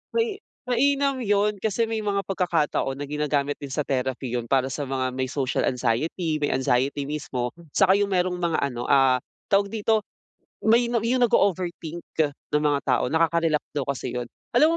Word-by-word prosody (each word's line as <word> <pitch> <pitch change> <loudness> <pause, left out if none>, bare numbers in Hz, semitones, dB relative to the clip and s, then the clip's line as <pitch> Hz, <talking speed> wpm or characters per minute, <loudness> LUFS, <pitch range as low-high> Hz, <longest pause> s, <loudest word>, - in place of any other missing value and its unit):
May 455 -3 0 0.3
mainam 275 +2 +2
'yun, 205 0 +2
kasi 220 +2 0
may 225 -1 -2
mga 200 -1 0
pagkakataon 170 -7 0
na 145 - -4
ginagamit 145 -1 0
din 140 -2 -7
sa 150 - -1
therapy 130 -1 -2
'yun 120 -1 -3
para 130 +1 +2
sa 145 - -3
mga 130 -1 -1
may 130 0 -1
social 135 -3 0
anxiety, 150 +7 0
may 145 - 0
anxiety 130 +2 +1
mismo, 130 -5 -3 0.2
saka 195 -1 +5
'yung 200 0 +1
merong 180 -1 +1
mga 170 -2 +1
ano 120 -3 -2
ah, 135 -2 +4 0.3
tawag 200 0 +4
dito, 220 -1 +1 0.6
may 235 +2 +4
na 235 - +2
'yung 245 +3 +1
nag-o-overthink 175 -6 0 0.5
na 150 - +3
mga 145 -2 +2
tao, 125 -3 +2
nakaka-relax 165 -1 +2 0.2
daw 140 - 0
kasi 140 - -3
'yun. 120 - -2 0.3
Alam 315 +5 +5
160 Hz, 170 wpm, -25 LUFS, 135-205 Hz, 0.6 s, saka